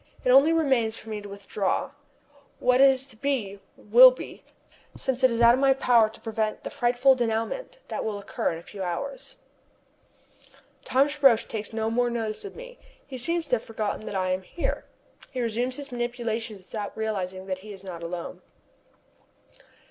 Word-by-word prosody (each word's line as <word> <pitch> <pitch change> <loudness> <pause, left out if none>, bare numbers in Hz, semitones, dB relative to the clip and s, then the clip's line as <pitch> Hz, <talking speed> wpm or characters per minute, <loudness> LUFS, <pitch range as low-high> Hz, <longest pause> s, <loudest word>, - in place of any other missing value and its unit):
It 250 - +4
only 275 +5 +7
remains 265 -9 +1
for 220 - -11
me 210 -1 -4
to 205 - -10
withdraw. 200 +5 -2 0.7
What 250 +1 +3
is 270 -1 +5
to 265 -4 -14
be, 220 -6 -2 0.2
will - - +8
be, - - -9 0.5
since 265 -1 -2
it 260 - +7
is 230 0 -1
out 235 0 +8
of 255 - +1
my 270 -1 +4
power 235 -4 +4
to 220 - -14
prevent 220 -1 -2
the - - -6
frightful 245 +2 +3
dénouement 240 - -2
that - - -3
will 215 -2 -3
occur 200 - -2
in 165 - -5
a 165 - -11
few 200 +2 -9
hours. 270 - -5 1.5
Thomas 285 +3 +1
Roch 245 -5 +5
takes 215 -2 -5
no 220 0 -2
more 245 +1 +1
notice 225 -2 -3
of 405 - -8
me. - - -11 0.3
He 260 -2 -8
seems 335 +5 0
to 250 - +3
have 225 - -11
forgotten 215 -1 -4
that - - -5
I 185 -1 0
am 185 +1 -1
here. 335 - -4 0.4
He 260 - -10
has 250 - 0
resumed 250 +2 -1
his 285 -1 -8
manipulations 235 -4 -3
without 210 -2 -5
realizing 190 -4 -3
that 185 -1 -3
he 210 +2 -11
is 195 -1 -11
not 180 -3 -7
alone. 170 0 -6
230 Hz, 185 wpm, -26 LUFS, 210-265 Hz, 1.5 s, will